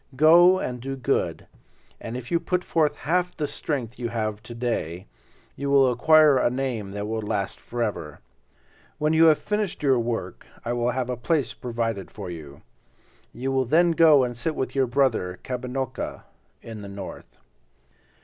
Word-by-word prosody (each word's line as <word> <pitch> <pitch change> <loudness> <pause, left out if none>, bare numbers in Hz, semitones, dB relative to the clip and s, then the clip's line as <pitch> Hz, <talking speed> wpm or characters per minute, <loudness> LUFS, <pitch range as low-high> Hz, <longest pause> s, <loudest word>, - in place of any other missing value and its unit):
Go 170 +6 +7
and 125 -8 -4
do 135 +2 -4
good, 130 - -1 0.5
and 115 +2 -6
if 120 -1 -9
you 170 - +3
put 180 +1 -1
forth 155 -3 +1
half 180 +2 -1
the 150 - -1
strength 130 -6 -4
you 120 -1 -2
have 110 -2 -3
to 120 - -10
day, 100 -7 -3 0.5
you 140 +1 -3
will 135 -2 +5
acquire 150 +2 +5
a - - +3
name 125 -5 -3
that 100 0 -4
will 110 0 -2
last 105 -2 -3
forever. 105 -11 -4 0.8
When 150 +1 +1
you 160 +1 +6
have 155 -2 +6
finished 210 -6 -3
your 135 -3 +4
work 115 -1 -3 0.2
I 120 - -1
will 120 0 0
have 125 0 -2
a - - -1
place 130 +1 0
provided 115 -5 -3
for 100 -4 -7
you. 75 -4 -10 0.7
You 135 +2 -3
will 130 -1 +1
then 170 +7 +4
go 160 -4 +6
and 120 -1 -2
sit 150 +7 -2
with 130 - -3
your 135 -2 +2
brother, 120 -8 0
Kabinocca, 130 +1 -4 0.4
in 110 -2 -8
the 100 - -8
north." 100 -1 -9
125 Hz, 170 wpm, -25 LUFS, 115-150 Hz, 0.8 s, Go